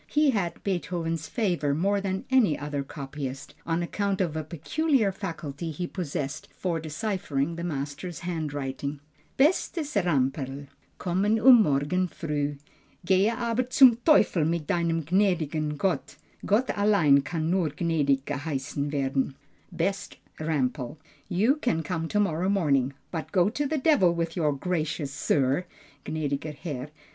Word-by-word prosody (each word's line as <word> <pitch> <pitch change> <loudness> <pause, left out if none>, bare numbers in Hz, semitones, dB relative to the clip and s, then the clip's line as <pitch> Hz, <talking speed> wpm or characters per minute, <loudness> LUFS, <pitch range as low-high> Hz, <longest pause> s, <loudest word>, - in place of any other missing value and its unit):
He 300 -2 +3
had 195 -7 -2
Beethoven's 170 -4 -2
favor 175 - 0
more 200 +5 +1
than 190 -1 -3
any 235 - +4
other 145 -1 -3
copyist, 140 -1 -6
on 165 +1 0
account 200 +2 -1
of 170 -5 0
a 155 - -2
peculiar 215 - +1
faculty 165 -5 -5
he 160 +3 -3
possessed 150 -5 -4
for 170 -3 -1
deciphering 160 -2 -2
the 170 - -5
master's 145 +2 -4
handwriting. 145 -4 -3 0.4
_Bestes 295 - +2
Ramperl, 135 -3 -1 0.3
Komme 185 +2 0
um 245 0 +8
morgen 150 +5 +1
früh. 145 -4 -3 0.5
Gehe 190 +3 +4
aber 235 +1 -1
zum 260 -6 +7
Teufel 235 - +4
mit 165 0 0
deinem 165 0 0
Gnädiger 160 -3 +1
Herr. 195 -2 0 0.4
Gott 225 +6 +2
allein 200 -9 +4
kann 160 +3 -2
nur 180 -4 +2
gnädig 145 -3 +1
geheissen 145 0 -3
werden._ 135 -1 0 0.4
BEST 195 +3 -2 0.2
RAMPEL, 145 -3 -1 0.3
You 220 - +3
can 240 - 0
come 165 0 -2
to 210 - 0
morrow 185 -2 +1
morning, 140 -9 +2 0.2
but 160 -3 -5
go 185 0 +3
to 290 +4 -1
the 310 +2 -1
devil 260 - +4
with 165 -1 -2
your 155 -5 +2
"Gracious 155 -1 -2
Sir," 145 +3 +1 0.4
(Gnädiger 150 -1 -2
Herr). 145 -3 -5
165 Hz, 135 wpm, -27 LUFS, 145-195 Hz, 0.5 s, um